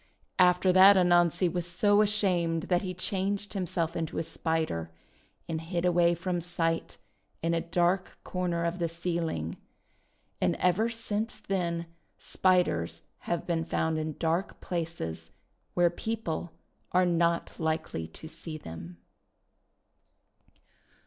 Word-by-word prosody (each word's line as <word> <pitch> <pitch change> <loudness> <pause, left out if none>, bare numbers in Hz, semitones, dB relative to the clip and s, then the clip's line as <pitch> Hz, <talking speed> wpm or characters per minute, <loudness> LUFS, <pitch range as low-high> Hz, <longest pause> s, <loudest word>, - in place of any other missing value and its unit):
After 180 0 +5
that 190 +2 +9
Anansi 175 0 +4
was 175 0 -2
so 205 +4 +3
ashamed 180 -6 +1
that 180 -1 +3
he 185 -2 -4
changed 195 +2 -2
himself 170 -3 -1
into 165 -2 -3
a - - 0
Spider, 160 - -2 0.6
and 160 -1 -2
hid 170 +1 -2
away 175 -1 +4
from 175 0 -2
sight 165 -1 -1 0.5
in 165 0 +1
a 165 - +1
dark 175 +2 0
corner 175 -2 -1
of 170 +2 -1
the 170 -1 0
ceiling. 165 - -2 0.8
And - - +2
ever 185 +6 +2
since 225 -1 -3
then 170 -3 -1 0.3
Spiders 180 - +1 0.3
have 170 - -1
been 165 -2 0
found 160 -1 0
in 155 -1 -4
dark 170 +3 -1
places, 90 - -4 0.5
where 175 -1 +4
people 175 -5 -3 0.4
are 180 0 +5
not 170 -1 +1
likely 160 - -2
to 120 - -11
see 160 0 -7
them. 85 - -9
170 Hz, 125 wpm, -29 LUFS, 165-185 Hz, 0.8 s, that